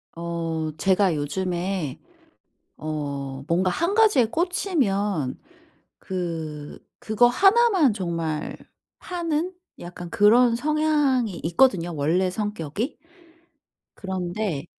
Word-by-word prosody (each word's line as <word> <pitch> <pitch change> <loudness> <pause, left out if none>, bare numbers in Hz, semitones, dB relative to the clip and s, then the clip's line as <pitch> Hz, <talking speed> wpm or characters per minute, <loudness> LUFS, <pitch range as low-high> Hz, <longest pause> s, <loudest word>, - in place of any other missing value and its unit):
어 165 -2 -3
제가 190 -2 +2
요즘에 175 0 -2 0.8
어 140 -3 -5
뭔가 180 +3 +1
1 335 - 0
가지에 425 - +5
꽂히면 215 - 0 0.6
그 160 -5 -5 0.2
그거 220 +3 +3
하나만 390 - +4
정말 165 -5 -3 0.4
파는 345 0 -2 0.3
약간 175 0 -8
그런 230 +2 +5
성향이 290 - +1
있거든요 175 -3 +2
원래 170 +6 +1
성격이. 210 - -3 1.0
그런데 185 -4 -3
190 Hz, 180 characters per minute, -24 LUFS, 165-255 Hz, 1.0 s, 가지에